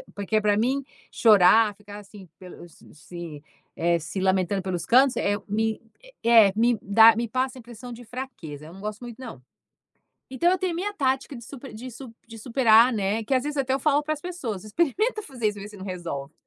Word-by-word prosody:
porque 205 Hz, +2 st, -1 dB
é -, -, +2 dB
para 205 Hz, -1 st, +2 dB
mim 260 Hz, +5 st, 0 dB, 0.3 s
chorar, 210 Hz, 0 st, +5 dB
ficar 205 Hz, 0 st, -11 dB
assim 200 Hz, -2 st, -14 dB
pelos 175 Hz, -3 st, -13 dB
se 160 Hz, -1 st, -10 dB, 0.3 s
eh 170 Hz, 0 st, +1 dB
se 165 Hz, +5 st, -6 dB
lamentando 190 Hz, 0 st, +1 dB
pelos 180 Hz, -2 st, -3 dB
cantos 260 Hz, +2 st, +4 dB
é 205 Hz, 0 st, 0 dB
me 220 Hz, +1 st, -1 dB, 0.4 s
é, 225 Hz, -4 st, +6 dB
me 235 Hz, +1 st, +2 dB
dá 220 Hz, +2 st, +6 dB
me 235 Hz, +1 st, -2 dB
passa 255 Hz, +3 st, -2 dB
a -, -, -11 dB
impressão 240 Hz, +1 st, -11 dB
de 245 Hz, -, -11 dB
fraqueza. 215 Hz, -, -8 dB
Eu 165 Hz, -, -12 dB
não 195 Hz, -, -12 dB
gosto 210 Hz, 0 st, -5 dB
muito, 240 Hz, -2 st, -9 dB
não. 230 Hz, -, -9 dB, 0.9 s
Então 305 Hz, +7 st, +1 dB
eu 370 Hz, -, +2 dB
tenho 370 Hz, -1 st, -2 dB
a -, -, -4 dB
minha 410 Hz, +4 st, -3 dB
tática 270 Hz, -3 st, -1 dB
de 235 Hz, -, -10 dB
super 270 Hz, 0 st, -10 dB
de 240 Hz, +4 st, -8 dB
su 240 Hz, 0 st, -11 dB
de 225 Hz, -1 st, -11 dB
superar, 230 Hz, 0 st, +4 dB
né, 205 Hz, +1 st, -1 dB
é -, -, -5 dB
que 270 Hz, -, -1 dB
às 255 Hz, -, +1 dB
vezes 295 Hz, 0 st, -4 dB
até 265 Hz, -1 st, 0 dB
eu 270 Hz, -, 0 dB
falo 290 Hz, +1 st, +2 dB
para 310 Hz, +1 st, -1 dB
as 295 Hz, -, -13 dB
pessoas 270 Hz, -, -5 dB
experimenta 340 Hz, -, 0 dB
fazer 250 Hz, -, -3 dB
isso, 205 Hz, 0 st, -8 dB
ver 200 Hz, +1 st, -8 dB
se 210 Hz, -, -13 dB
não 190 Hz, -, -9 dB
resolve 165 Hz, -6 st, -6 dB
225 Hz, 220 wpm, -25 LUFS, 200-260 Hz, 0.9 s, é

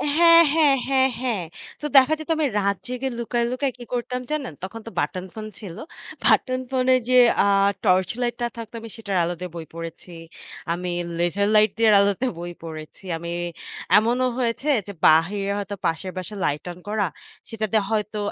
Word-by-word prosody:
হ্যাঁ, 335 Hz, 0 st, +8 dB
হ্যাঁ, 305 Hz, -4 st, +5 dB
হ্যাঁ, 265 Hz, -1 st, +4 dB
হ্যাঁ। 235 Hz, -7 st, -1 dB, 0.4 s
তো -, -, -5 dB
দেখা 270 Hz, +3 st, +7 dB
যেত 315 Hz, -, -9 dB
আমি 310 Hz, -, +1 dB
রাত 200 Hz, -1 st, +1 dB
জেগে 250 Hz, +2 st, -3 dB
লুকায়, 235 Hz, 0 st, -1 dB
লুকায় 265 Hz, +2 st, -1 dB
কি 245 Hz, -, -9 dB
করতাম 250 Hz, +1 st, -2 dB
জানেন? 285 Hz, -, -2 dB
তখন 210 Hz, +4 st, -6 dB
তো -, -, -3 dB
বাটন 185 Hz, -1 st, -2 dB
ফোন 215 Hz, -1 st, -7 dB
ছিল। 190 Hz, -6 st, -8 dB, 0.5 s
বাটন 255 Hz, -1 st, +3 dB
ফোনে 260 Hz, 0 st, +3 dB, 0.2 s
যে -, -, +2 dB, 0.3 s
আ -, -, +2 dB, 0.4 s
টর্চ 185 Hz, -2 st, +3 dB
লাইটটা 240 Hz, 0 st, -1 dB
থাকতো 230 Hz, -1 st, -8 dB
আমি 230 Hz, -, -9 dB
সেটার 205 Hz, -4 st, -4 dB
আলো 170 Hz, +1 st, -1 dB
দিয়ে 180 Hz, -1 st, -6 dB
বই 165 Hz, -1 st, -6 dB
পড়েছি। 165 Hz, +1 st, -8 dB, 0.6 s
আমি 180 Hz, +1 st, -4 dB, 0.3 s
লেজার 175 Hz, +4 st, +1 dB
লাইট 215 Hz, 0 st, +6 dB
দিয়ের 225 Hz, -2 st, +5 dB
আলোতে 200 Hz, +4 st, +2 dB
বই 175 Hz, +1 st, -6 dB
পড়েছি। 155 Hz, 0 st, -9 dB
আমি 170 Hz, +1 st, -7 dB, 0.7 s
এমনও 240 Hz, +4 st, +2 dB
হয়েছে 240 Hz, +3 st, -1 dB, 0.2 s
যে 200 Hz, -, -6 dB
বাহিরে 195 Hz, +6 st, +4 dB
হয়তো 205 Hz, 0 st, -4 dB
পাশের 165 Hz, +3 st, -1 dB
বাসার 185 Hz, +3 st, -5 dB
লাইট 145 Hz, 0 st, -1 dB
অন 175 Hz, -, -11 dB
করা, 210 Hz, -1 st, 0 dB, 0.4 s
সেটাতে 220 Hz, -1 st, -1 dB
হয়তো 215 Hz, -1 st, -1 dB
215 Hz, 175 wpm, -23 LUFS, 185-250 Hz, 0.7 s, হ্যাঁ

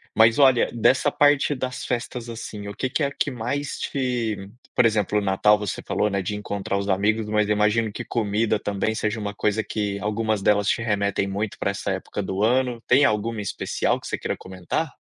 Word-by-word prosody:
Mas 115 Hz, +2 st, +5 dB
olha 130 Hz, -4 st, +5 dB
dessa 130 Hz, +5 st, +3 dB
parte 145 Hz, 0 st, +3 dB
das 130 Hz, 0 st, -4 dB
festas 120 Hz, 0 st, -3 dB
assim, 110 Hz, -3 st, -7 dB
o 100 Hz, -, -6 dB
que 130 Hz, -, -2 dB
que 145 Hz, +4 st, 0 dB
é -, -, +3 dB
a 140 Hz, -, -6 dB
que -, -, -1 dB
mais 130 Hz, +4 st, -3 dB
te 115 Hz, -7 st, -2 dB, 0.3 s
por 125 Hz, -, +4 dB
exemplo, 105 Hz, -2 st, +2 dB
o -, -, -3 dB
Natal, 100 Hz, +2 st, +4 dB
você 105 Hz, -2 st, -4 dB
falou, 105 Hz, -, +1 dB
né. 100 Hz, -1 st, -1 dB
De 105 Hz, +3 st, -3 dB
encontrar 100 Hz, -1 st, -3 dB
os 100 Hz, 0 st, -3 dB
amigos, 105 Hz, +3 st, +1 dB
mas 105 Hz, 0 st, +1 dB
eu 105 Hz, -, +2 dB
imagino 105 Hz, +1 st, +2 dB
que -, -, -6 dB
comida 110 Hz, -1 st, 0 dB
também 100 Hz, +2 st, -1 dB
seja 110 Hz, +1 st, -1 dB
uma 105 Hz, -1 st, -4 dB
coisa 105 Hz, +2 st, 0 dB
que 100 Hz, -2 st, -3 dB
algumas 105 Hz, 0 st, -1 dB
delas 105 Hz, 0 st, +3 dB
te -, -, +1 dB
remetem 100 Hz, -3 st, 0 dB
muito 100 Hz, +2 st, -3 dB
para 100 Hz, -, 0 dB
essa 100 Hz, 0 st, -3 dB
época 95 Hz, +2 st, -4 dB
do 95 Hz, +2 st, -2 dB
ano. 125 Hz, 0 st, +1 dB
Tem 135 Hz, +3 st, +5 dB
alguma 110 Hz, +1 st, 0 dB
em -, -, -2 dB
especial 100 Hz, -, -1 dB
que -, -, -9 dB
você -, -, -2 dB
queira -, -, -3 dB
comentar? 95 Hz, -2 st, -3 dB
105 Hz, 215 wpm, -24 LUFS, 100-120 Hz, 0.3 s, Mas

